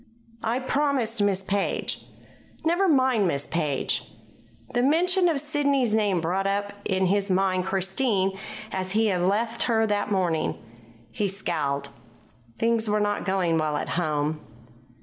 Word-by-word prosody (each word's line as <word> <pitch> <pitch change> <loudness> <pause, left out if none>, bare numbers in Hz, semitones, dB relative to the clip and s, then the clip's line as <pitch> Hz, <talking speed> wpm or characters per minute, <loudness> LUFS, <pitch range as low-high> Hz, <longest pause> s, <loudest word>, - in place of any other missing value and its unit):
"I 230 +2 0
promised 260 -4 0
Miss 195 -2 +1
Page." 200 +1 -1 0.6
"Never 350 +4 +3
mind 260 - +3
Miss 140 -4 0
Page." 150 -5 -1 0.6
The 245 - +2
mention 355 +6 +3
of 305 -4 +1
Sidney's 280 -5 +1
name 205 -5 +2
brought 185 +4 0
up 200 +1 -1
in 190 -1 +1
his 200 +2 +1
mind 185 -1 +1
Christine 190 +1 +1 0.4
as 185 0 -3
he 220 +1 +3
had 180 -3 0
left 220 +5 0
her 225 -1 +3
that 210 -1 -1
morning. 175 -5 0 0.5
He 205 - -1
scowled. 145 -7 -2 0.7
Things 230 -1 +1
were 210 0 +2
not 205 0 -1
going 180 -4 +1
well 155 -1 0
at - - -4
home. 155 -2 -1
200 Hz, 140 wpm, -25 LUFS, 185-235 Hz, 0.7 s, Never